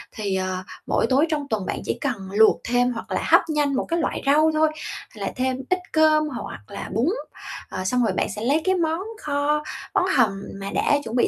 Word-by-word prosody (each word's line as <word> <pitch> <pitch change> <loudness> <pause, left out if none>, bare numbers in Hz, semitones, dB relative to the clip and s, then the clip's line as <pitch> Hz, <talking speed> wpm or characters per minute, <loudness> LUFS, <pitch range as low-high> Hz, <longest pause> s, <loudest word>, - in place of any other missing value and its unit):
thì, 200 -3 -2
ờ, 185 0 -2 0.2
mỗi - - +2
tối 275 +4 +4
trong 295 -3 -1
tuần 205 -4 -1
bạn - - -3
chỉ - - -1
cần 280 -3 +1 0.2
luộc 220 +2 +5
thêm, 245 +1 +2
hoặc 230 - -7
là - - 0
hấp - - +6
nhanh 295 -2 +1
một 260 - 0
cái 335 +1 +1
loại - - -1
rau 310 +3 +5
thôi, 310 0 +3 0.4
là - - -4
thêm 260 0 0
ít 370 0 +2
cơm 310 -1 +5
hoặc 250 - -6
là - - -7
bún, 230 +6 +2 0.6
ờ, 185 - -4
xong 250 +5 +2
rồi - - +1
bạn - - 0
sẽ 210 - -6
lấy 280 +7 +2
cái 375 - +3
món 325 -1 0 0.2
kho, 295 +1 0 0.3
món 370 - +3
hầm 200 -6 +3 0.2
mà 195 - -5
đã 290 - +3
chuẩn 225 +2 -5
bị 245 - +4
270 Hz, 225 wpm, -23 LUFS, 225-310 Hz, 0.6 s, hấp